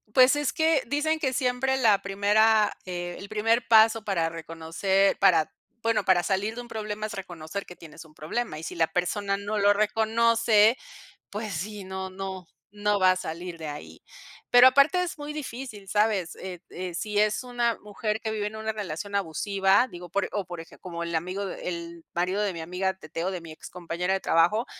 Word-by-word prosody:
Pues, 260 +2 +7
es 295 -2 0
que 320 -3 +3
dicen 315 +3 0
que 265 -4 0
siempre 255 +1 +1
la 215 -6 +4
primera 210 +2 +3
eh, 175 -1 -5
el 200 - -8
primer 225 +2 +1
paso 225 0 +6
para 170 -5 0
reconocer 165 +4 0
para 170 -5 +4 0.3
bueno, 225 -2 +2
para 180 -2 +4
salir 200 +4 -1
de 245 - -5
un 240 - -11
problema 215 -1 -4
es 215 - -5
reconocer 180 -1 -6
que 180 - -11
tienes 165 -1 -12
un 160 -2 -19
problema, 160 +4 -3
y - - -10
si - - -6
la 165 -1 +2
persona 195 +3 -1
no 205 +1 -3
lo 205 0 +5
reconoce, 220 +1 +3 0.5
pues, 210 +1 -5
sí, 200 +4 -5
no, 190 0 -5
no, 190 -1 -6 0.2
no 205 0 0
va 185 0 +6
a - - +1
salir 175 0 -6
de 160 -1 -6
ahí. 150 0 -8 0.5
Pero 245 +1 +9
aparte 280 +7 +4
es 345 - -5
muy 295 0 -6
difícil, 250 -8 -7
¿sabes? 210 -4 +1
Eh, 180 -2 -7
de 180 -1 -6
si 205 +4 -1
es 215 +3 +2
una 240 -2 0
mujer 210 +1 -3
que 220 - -2
vive 210 -1 -2
en 215 - -7
una 220 0 -2
relación 200 -2 -5
abusiva, 195 +4 +2
digo, 175 0 -9
por 200 +3 -1
o 205 -2 -2
por 175 -2 -7
eje 165 - -15
como 170 -2 -7
el 170 0 -4
amigo 185 +5 -2
el 170 -2 -6
marido 185 +4 0
de 200 -2 -1
mi 165 - -6
amiga, 180 +3 -1
Teteo, 170 -1 -5
de 180 -2 -5
mi 165 -1 -10
excompañera 175 +3 -4
de 195 - 0
trabajo, 175 +8 +3
200 Hz, 195 wpm, -26 LUFS, 175-220 Hz, 0.5 s, Pero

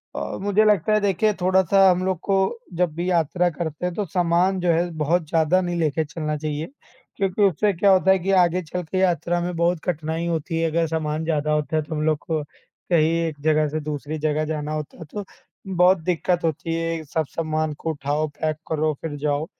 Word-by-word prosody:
अ, - - -4
मुझे 205 +2 +3
लगता 210 0 +3
है 215 - +4
देखिए 205 +2 +2
थोड़ा-सा 190 +1 +4
हम 180 0 +2
लोग 185 -3 -1
को 195 - +1 0.4
जब 175 -3 +1
भी 175 +2 -2
यात्रा 175 +1 +2
करते 160 0 -4
हैं, 180 - -1
तो 210 - -1
सामान 180 +2 +1
जो 175 -1 +2
है 170 +2 +1
बहुत 155 +2 +1
ज़्यादा 165 +3 +3
नहीं 175 -1 -2
लेके 160 -1 +1
चलना 150 0 -3
चाहिए 150 +1 -3 0.5
क्योंकि 195 0 -1
उससे 200 +2 +3
क्या 195 +3 +3
होता 190 0 +5
है 190 - +4
कि 190 +2 -1
आगे 175 +1 +2
चल 180 +3 -4
के 170 +3 -4
यात्रा 175 -2 +1
में 175 0 -3
बहुत 170 +1 +1
कठिनाई 160 -1 -2
होती 165 -1 -2
है। 165 0 +1
अगर 165 +1 +1
सामान 155 -1 -2
ज़्यादा 155 -2 0
होता 150 +1 -1
है, - - +2
तो 155 +2 -6
हम 150 - -2
लोग 155 -1 +2
को 155 -2 -1
कहीं 155 +2 -1 0.2
एक 150 -3 -6
जगह 155 0 +2
से 155 +2 -2
दूसरी 150 0 -4
जगह 155 0 0
जाना 150 -1 -3
होता 155 -1 -5
है, 165 - -8
तो 205 - -4 0.5
बहुत 180 +2 +5
दिक्कत 175 0 0
होती 165 0 -1
है। 165 -1 -2
सब 155 +1 -2
सामान 155 -1 -2
को 160 +2 -5
उठाओ, 145 +1 -1
पैक 155 +1 -3
करो 155 -1 +1
फिर 160 -3 -4
जाओ। 145 +1 -1
165 Hz, 215 wpm, -23 LUFS, 155-180 Hz, 0.5 s, होता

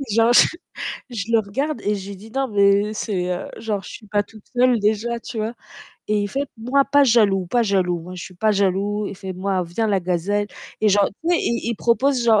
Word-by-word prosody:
genre 230 +1 +5
je - - +7 0.6
je 230 -5 -3
le 230 - +5
regarde 270 +9 -3
et 210 +1 0
je 195 0 -7
lui 200 - -6
dis: 215 +3 -13
«Non, 270 +1 0
mais 200 0 +3
c'est, 190 -4 -2
heu» 180 - -3
genre 210 -4 -2
je - - -9
suis 215 - -11
pas 205 0 +1
toute 215 0 -16
seule 245 -1 +4
déjà, 220 +3 0
tu 235 0 -8
vois 220 +2 -2 0.6
et 210 -1 +2
il 205 - -1
fait: 275 +6 -2
«Moi, 260 +5 +2
pas 285 0 +4
jaloux, 205 -7 +3
pas 240 +6 +2
jaloux. 185 -4 +1
Moi, 180 +3 -9
je 175 - -6
suis 185 - -11
pas 215 +5 +1
jaloux». 200 +1 0
Il 200 - -8
fait: 190 -1 -6
«Moi, 185 0 -1
viens 175 +7 -2
la 195 -2 +2
gazelle». 185 +4 0 0.3
Et 215 - +4
genre 205 0 +4
tu 325 - -4
sais 350 - +4
il 235 - 0
il 235 - -1
il 235 - -2
propose 245 +3 +2
genre 220 -3 +5
210 Hz, 240 wpm, -22 LUFS, 195-235 Hz, 0.6 s, je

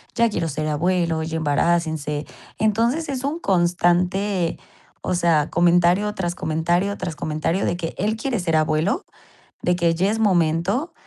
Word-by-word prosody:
ya 235 -1 +3
quiero 165 - -1
ser 155 +2 -3
abuelo, 165 +1 0
ya 160 0 -3
embarácense". 155 -1 0 0.3
Entonces, 230 +9 +1
es 265 -1 -3
un 290 +4 -1
constante, 180 - +1 0.4
o 185 - -2
sea, 165 -4 +2
comentario, 175 +4 +3
tras 175 -3 -2
comentario, 175 +6 0
tras 160 - -4
comentario 155 +5 -1
de 175 - -1
que 165 -2 -4
él 215 +3 0
quiere 240 -4 -2
ser 165 -3 0
abuelo, 155 - 0 0.6
de 180 - +2
que 170 -1 +1
ya 190 +4 +1
es 225 - -2
momento. 185 - +1
175 Hz, 150 wpm, -22 LUFS, 160-200 Hz, 0.6 s, ya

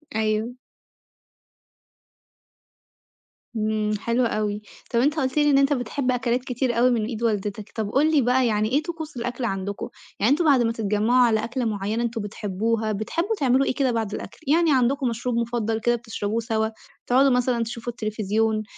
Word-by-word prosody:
أيوه. 220 +2 0 3.0
إمم، 215 -1 0
حلو 235 +2 +1
أوي. 210 -2 -1 0.3
طَب، 235 - +2
أنت 290 +5 +2
قُلت 260 +2 -1
لي 295 0 +4
إن 275 - +5
أنت 275 +1 +4
بتحب 255 0 -1
أكلات 245 +1 0
كتير 250 -2 -1
أوي 250 +2 +5
من 225 -3 +1
إيد 230 0 -5
والدتك. 210 -1 -2
طَب، 215 -2 -2
قُل 305 +3 +3
لي 295 -3 +4
بقى، 250 +1 +3
يعني 215 0 +1
إيه 295 +3 +2
طقوس 320 -5 -6
الأكل 245 +1 -3
عندكم؟ 195 -1 -3 0.3
يعني 220 +6 +3
أنتم 325 +3 +2
بعد 275 -5 +5
ما 230 -1 +2
تتجمعوا 225 +3 +2
على 220 -1 +1
أكلة 245 +1 -2
معينة 215 +2 -1
أنتم 230 -2 -2
بتحبوها، 215 +2 -2
بتحبوا 335 - -1
تعملوا 265 0 +3
إيه - - 0
كده 265 -3 +1
بعد 225 -3 -2
الأكل؟ - - -7
يعني 320 0 +4
عندكم 260 +1 +2
مشروب 235 +1 -2
مفضل 230 -1 -1
كده 240 +1 +2
بتشربوه 225 -1 -3
سوا؟ 220 -1 0 0.4
تقعدوا 265 +3 +5
مثلًا 245 -1 +1
تشوفوا 230 +1 -5
التليفزيون؟ 215 0 -1
235 Hz, 170 wpm, -24 LUFS, 215-255 Hz, 3.0 s, إن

